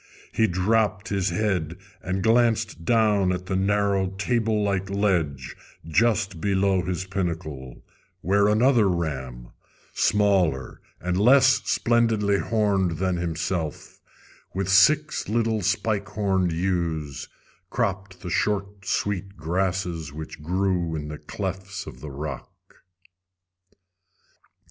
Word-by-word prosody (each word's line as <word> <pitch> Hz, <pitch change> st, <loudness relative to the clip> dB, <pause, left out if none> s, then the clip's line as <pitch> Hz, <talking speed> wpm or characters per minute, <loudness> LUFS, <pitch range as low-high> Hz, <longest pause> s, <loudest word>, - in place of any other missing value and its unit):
He 110 Hz, -, +2 dB
dropped 100 Hz, +2 st, +1 dB
his 95 Hz, -1 st, 0 dB
head 90 Hz, -3 st, -1 dB, 0.2 s
and 95 Hz, 0 st, -2 dB
glanced 110 Hz, -5 st, +2 dB
down 105 Hz, -5 st, +3 dB
at 90 Hz, 0 st, -3 dB
the 95 Hz, -, -2 dB
narrow 100 Hz, 0 st, +1 dB
table 105 Hz, +2 st, 0 dB
like 100 Hz, -1 st, -1 dB
ledge 85 Hz, -10 st, -1 dB, 0.3 s
just 95 Hz, -1 st, +1 dB
below 95 Hz, -1 st, +2 dB
his 90 Hz, +1 st, -3 dB
pinnacle, 80 Hz, -9 st, -4 dB, 0.4 s
where 100 Hz, +4 st, +3 dB
another 110 Hz, 0 st, +4 dB
ram, 65 Hz, -8 st, -3 dB, 0.4 s
smaller 95 Hz, -10 st, +1 dB, 0.2 s
and 90 Hz, 0 st, -2 dB
less 130 Hz, +4 st, +5 dB
splendidly 115 Hz, -4 st, +2 dB
horned 100 Hz, -6 st, +1 dB
than 95 Hz, 0 st, 0 dB
himself, 85 Hz, -1 st, -3 dB, 0.5 s
with 95 Hz, 0 st, -1 dB
six 150 Hz, +12 st, +4 dB
little 110 Hz, -1 st, +1 dB
spike 100 Hz, +2 st, 0 dB
horned 95 Hz, -4 st, 0 dB
ewes, 80 Hz, -5 st, -2 dB, 0.4 s
cropped 100 Hz, -4 st, -2 dB
the 90 Hz, -, -6 dB
short 100 Hz, 0 st, -1 dB
sweet 100 Hz, -1 st, -2 dB
grasses 90 Hz, -1 st, -2 dB
which 75 Hz, 0 st, -8 dB
grew 90 Hz, 0 st, 0 dB
in 75 Hz, -1 st, -5 dB
the 75 Hz, -, -7 dB
clefts 95 Hz, +1 st, -5 dB
of -, -, -10 dB
the 75 Hz, -, -7 dB
rock. 70 Hz, -1 st, -8 dB
95 Hz, 110 wpm, -25 LUFS, 85-105 Hz, 0.5 s, less